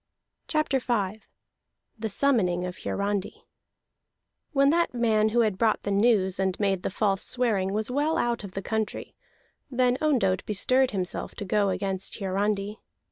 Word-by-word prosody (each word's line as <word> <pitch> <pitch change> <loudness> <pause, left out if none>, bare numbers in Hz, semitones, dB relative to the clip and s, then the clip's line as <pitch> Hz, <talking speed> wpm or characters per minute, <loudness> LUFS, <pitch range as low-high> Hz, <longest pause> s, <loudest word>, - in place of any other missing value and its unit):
CHAPTER 305 -4 +1
V 215 -4 -1 0.8
THE 220 0 -2
SUMMONING 195 -8 +2
OF 180 0 -6
HIARANDI 200 0 -3 1.1
When 275 -2 +4
that 340 -5 +1
man 220 -2 +2
who 235 +2 +2
had 210 -4 0
brought 225 -2 +2
the 200 - -2
news 200 -3 +2
and 190 -1 0
made 195 -3 +1
the - - -2
false 195 0 0
swearing 215 -7 0
was 215 +4 -1
well 295 +4 +1
out 235 -2 0
of 195 -2 -8
the 195 - -5
country, 220 -1 -3 0.6
then 250 -1 +1
Ondott 230 -12 +2
bestirred 255 +6 +3
himself 185 -4 -4
to 205 - -5
go 200 +1 +1
against 190 0 -2
Hiarandi. 200 +1 -1
210 Hz, 150 wpm, -26 LUFS, 195-245 Hz, 1.1 s, When